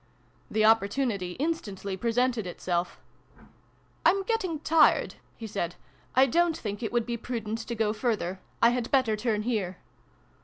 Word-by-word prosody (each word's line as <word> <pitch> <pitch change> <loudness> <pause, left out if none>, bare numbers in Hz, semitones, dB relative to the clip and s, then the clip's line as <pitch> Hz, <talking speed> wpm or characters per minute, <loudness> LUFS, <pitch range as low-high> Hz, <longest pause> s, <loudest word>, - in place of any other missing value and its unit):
The 215 0 +2
opportunity 215 -3 +2
instantly 205 - -3
presented 235 0 0
itself. 175 0 -2 0.5
" - - -35
I'm 390 +4 +4
getting 380 -7 -1
tired," 315 -1 +4 0.2
he 225 - -7
said. 195 -5 -3 0.2
" - - -30
I 260 +1 +7
don't 335 +4 +2
think 205 -1 -5
it 225 - -2
would 235 -1 +1
be 235 0 -3
prudent 225 -2 -4
to 235 +1 -5
go 215 -1 +1
further. 215 -5 -1 0.2
I 235 - +7
had 245 -1 -2
better 255 -5 +3
turn 215 -1 -1
here. 205 -6 -1
225 Hz, 155 wpm, -28 LUFS, 205-255 Hz, 0.5 s, I